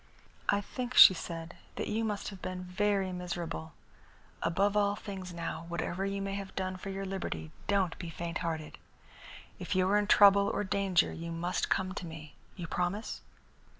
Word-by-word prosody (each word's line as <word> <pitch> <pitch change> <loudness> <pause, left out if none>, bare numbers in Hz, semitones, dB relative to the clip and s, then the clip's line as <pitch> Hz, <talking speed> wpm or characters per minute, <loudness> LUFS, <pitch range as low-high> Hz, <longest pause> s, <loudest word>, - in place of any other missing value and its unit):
"I 200 - +3
think," 250 +4 -5
she - - +11
said, 165 -1 -6 0.2
"that - - -3
you 220 +2 0
must 210 -2 -2
have 195 -3 -10
been 185 0 -4
very 195 +1 0
miserable. 175 - -4 0.7
Above 200 +4 +1
all 205 -1 +3
things, 190 -3 -7
now, 170 -1 -5
whatever 175 +3 -2
you 195 0 -2
may 195 0 -3
have 195 -1 -6
done 185 -1 -2
for 185 +2 -7
your 195 0 -4
liberty, 80 - -4 0.2
don't 195 -4 +2
be 170 - -5
fainthearted. 165 -1 -4 0.8
If - - -3
you 185 0 +3
are 205 +1 +4
in 205 - -1
trouble 200 -1 +7
or - - -1
danger 190 -2 +2
you 170 0 -6
must 170 +2 -1
come 185 -1 0
to 180 - -5
me. 155 -2 -9 0.2
You 175 - -5
promise?" 180 +6 -2
185 Hz, 175 wpm, -31 LUFS, 170-200 Hz, 0.8 s, she